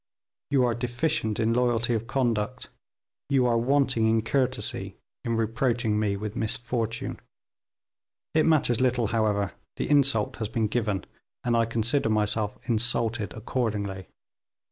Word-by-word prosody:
You 140 -3 +3
are 120 - +1
deficient 120 -1 -1
in 115 0 +2
loyalty 120 -1 +1
of 115 0 -2
conduct; 120 -2 -1 0.6
you 135 -3 +3
are 120 -1 +3
wanting 125 -3 +2
in 110 0 +2
courtesy, 130 +2 -1 0.3
in 115 -1 -1
reproaching 115 -1 0
me 100 -2 0
with 105 +1 -5
misfortune. 115 0 -2 1.1
It 155 0 +3
matters 135 -7 +3
little, 125 -4 +2
however, 105 -3 +1 0.2
the - - -2
insult 140 -7 +3
has 110 - -2
been 110 +1 0
given, 105 -4 -1 0.4
and 120 -1 +1
I 115 0 +3
consider 115 +3 0
myself 105 0 0
insulted 115 -2 +1
accordingly. 105 -5 -3
115 Hz, 130 wpm, -26 LUFS, 110-125 Hz, 1.1 s, You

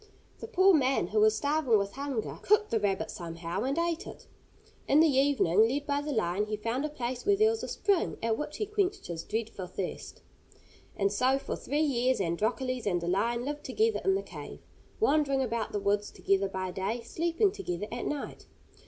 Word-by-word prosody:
The - - -7
poor 385 -3 +5
man, 265 - +2
who 215 +1 +1
was 215 0 +5
starving 285 -5 +2
with 200 0 -1
hunger, 275 -3 -4
cooked 425 +1 +3
the 225 - +2
rabbit 205 +1 -1
somehow, 170 -2 -5
and 270 +4 -1
ate 335 0 -1
it. - - -10 0.6
In 285 - +5
the 320 - +7
evening, 260 - +4
led 280 +4 -2
by 285 0 0
the 295 +1 -4
lion, 210 -4 0
he 215 0 -2
found 230 +6 -2
a 305 - -1
place 250 -3 -4
where 405 +1 +4
there 435 +2 +4
was 455 - -3
a - - -4
spring, 400 -4 0
at 225 -1 +2
which 300 +4 -5
he 425 - -1
quenched 400 -1 -1
his 170 -2 -4
dreadful 215 -4 -4
thirst. 185 0 -6 0.7
And 200 0 +1
so 255 +6 +2
for 275 - -4
three 295 +2 -1
years 255 -3 +1
Androcles 225 +7 -1
and 175 -3 +1
the 170 - -5
lion 235 +7 0
lived 295 +1 -4
together 440 - +1
in 385 0 +3
the 390 - -2
cave; - - -9 0.4
wandering 295 -9 +2
about 230 -3 -2
the 205 - -1
woods 200 +1 0
together 195 0 0
by 185 -1 -3
day, 195 +6 -2
sleeping 340 - +1
together 180 - -4
at 240 +1 -3
night. 295 -1 -5
250 Hz, 200 wpm, -29 LUFS, 205-300 Hz, 0.7 s, the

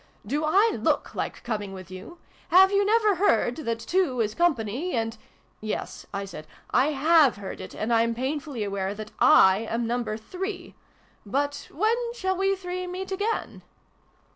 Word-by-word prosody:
" - - -30
Do 290 +8 -1
I 395 +9 +4
look - - 0
like - - -4
coming 210 -4 -3
with 185 -1 -10
you? 185 - -10 0.3
Have 380 +2 +7
you 400 0 +3
never 425 -2 +3
heard 245 - +2
that 230 -7 -2
two 260 +2 0
is 215 -2 0
company, 285 - 0
and 225 0 -1 0.2
" - - -37
'Yes," 215 0 -5
I 200 0 -3
said, 155 -5 -10 0.2
" - - -25
I 255 +3 +4
have 305 -1 +4
heard 200 -2 -7
it: - - -9
and 225 +2 -1
I'm 230 0 +2
painfully 270 -1 -3
aware 200 0 -3
that 215 0 -8
/ - - -24
am 220 +5 +5
Number 230 -2 -2
Three! 365 - -6 0.5
But, 285 +7 -2
when 430 +9 +2 0.2
shall 380 -5 -1
we 390 +1 +1
three 365 -1 -5
meet 370 +2 -6
again 410 +4 -2
270 Hz, 175 wpm, -26 LUFS, 220-365 Hz, 0.5 s, Have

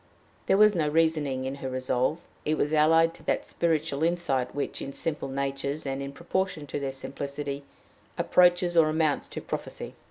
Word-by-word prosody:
There 195 - +4
was 210 0 +7
no 160 -5 +1
reasoning 150 -4 +1
in 135 - -2
her 130 - -3
resolve: 130 +3 0 0.3
it 155 +1 0
was 150 +2 0
allied 165 +2 +5
to - - -16
that - - +1
spiritual 155 -4 0
insight 165 -7 0
which, 145 - -3
in 140 - -5
simple 150 -1 -2
natures, 140 +2 -2
and 135 0 -2
in 140 0 -5
proportion 170 +1 -2
to 145 - -4
their 135 -1 -2
simplicity, 140 +1 -5 0.6
approaches 175 -1 +4
or 160 -2 +6
amounts 155 -2 +1
to - - -6
prophecy. - - -5
150 Hz, 170 wpm, -27 LUFS, 140-165 Hz, 0.6 s, was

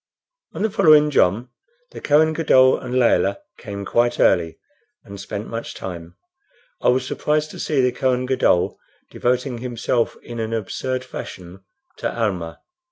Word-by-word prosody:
On - - -3
the 220 - 0
following 155 -7 +5
jom 115 +1 +2 0.4
the - - -10
Kohen 155 +2 +3
Gadol 130 -5 +4
and 125 0 -5
Layelah 100 -5 +3 0.2
came 100 -3 -7
quite 120 +4 +1
early 85 -2 +2 0.5
and 100 0 -10
spent 100 +2 -6
much 115 0 -6
time. 85 -2 -8 0.7
I - - 0
was 125 +1 +3
surprised 150 +3 -1
to - - -10
see 145 -4 0
the 125 0 +2
Kohen 130 0 0
Gadol 125 -9 +1 0.3
devoting 125 0 -1
himself 120 -1 -1
in 120 -1 -8
an 110 0 -3
absurd 130 +4 -3
fashion 95 -6 -9 0.3
to - - -2
Almah. 90 -7 -2
120 Hz, 150 wpm, -21 LUFS, 100-130 Hz, 0.7 s, following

